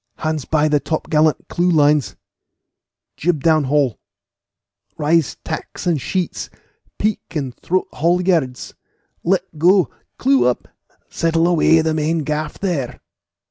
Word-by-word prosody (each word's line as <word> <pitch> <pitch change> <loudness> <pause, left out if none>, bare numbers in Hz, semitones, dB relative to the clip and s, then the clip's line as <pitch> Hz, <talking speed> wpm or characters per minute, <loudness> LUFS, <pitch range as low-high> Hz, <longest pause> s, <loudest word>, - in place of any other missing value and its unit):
Hands 155 -3 -2
by 155 -1 +2
the 150 -1 +2
top 155 +2 -4
gallant 155 0 +2
clew 175 +1 0
lines 150 -3 +3 1.0
jib 160 -3 0
down 155 -3 +3
haul 135 -3 +1 1.0
rise 160 0 +1
tacks - - -6
and 165 -6 +1
sheets 185 +4 -3 0.5
peak 215 0 0
and 135 -5 -2
throat 185 +1 -1
haulyards 170 -5 0 0.5
let 180 -3 -1
go 180 -2 +4 0.3
clew 130 -2 +3
up 125 - -1 0.4
settle 165 0 +1
away 165 -1 +4
the 160 0 0
main 155 +1 0
gaff 150 +1 -3
there!" 170 -11 -3
155 Hz, 125 wpm, -19 LUFS, 150-170 Hz, 1.0 s, go